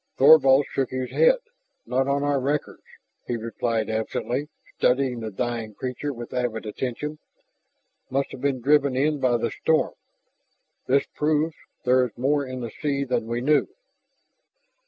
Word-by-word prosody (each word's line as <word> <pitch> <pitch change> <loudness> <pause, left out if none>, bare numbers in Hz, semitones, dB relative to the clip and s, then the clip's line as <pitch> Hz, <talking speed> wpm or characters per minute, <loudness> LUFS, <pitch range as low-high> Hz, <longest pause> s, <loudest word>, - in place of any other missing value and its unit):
Thorvald 140 -1 +7
shook 135 -2 -1
his 130 -1 -4
head. - - +5 0.5
"Not 130 +3 0
on 140 +1 +1
our 145 -1 +1
records," 140 +3 -2 0.5
he 120 - -1
replied 115 0 -2
absently, 120 +5 -2 0.3
studying 125 -1 +1
the 110 -1 -4
dying 115 0 -3
creature 130 +5 -4
with 120 -3 -8
avid 120 -3 -2
attention. 130 +7 -4 0.9
"Must 135 +1 -1
have - - -9
been 140 -3 0
driven 140 0 +3
in 145 +3 +1
by 125 -2 +2
the 115 -1 -2
storm. 160 -1 +1 0.9
This 135 +2 +3
proves 155 +1 +1 0.3
there 125 +1 +4
is 120 -4 -5
more 140 +3 +1
in 130 0 -5
the 115 -2 -5
sea 140 +1 -1
then 125 -4 -1
we 120 +1 -2
knew!" 150 +3 +3
130 Hz, 150 wpm, -25 LUFS, 120-145 Hz, 0.9 s, Thorvald